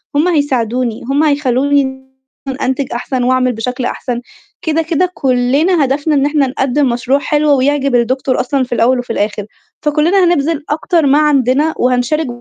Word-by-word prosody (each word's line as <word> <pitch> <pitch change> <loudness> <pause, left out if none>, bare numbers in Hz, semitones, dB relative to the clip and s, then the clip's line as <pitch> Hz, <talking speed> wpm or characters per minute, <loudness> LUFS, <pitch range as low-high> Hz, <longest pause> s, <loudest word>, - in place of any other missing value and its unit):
هم 305 +5 +2
هيساعدوني، 255 -7 -1
هم 285 +3 +2
هيخلّوني 275 -2 0 0.6
أنتج 260 0 -2
أحسن 250 +1 -2
وأعمل 255 0 +2
بشكل 250 +3 -4
أحسن، 245 -1 -4 0.4
كده، 320 0 0
كده 335 +3 0
كُلّنا 275 +6 +1
هدفنا 290 +3 0
إن 275 - +2
إحنا 290 -2 +1
نقدّم 265 +1 0
مشروع 245 +3 0
حلو 295 0 +1
ويعجب 275 0 +1
الدكتور 255 +2 0
أصلًا 265 +1 0
في 245 -1 -4
الأول 245 +2 +2
وفي 245 -2 -4
الآخِر، 210 -1 -2 0.4
فكُلّنا 310 +6 +2
هنبذل 325 -2 0
أكتر 320 +1 0
ما 280 +2 +4
عندنا 290 +1 +2
وهنشارك 255 +5 0
275 Hz, 150 wpm, -14 LUFS, 250-300 Hz, 0.6 s, ما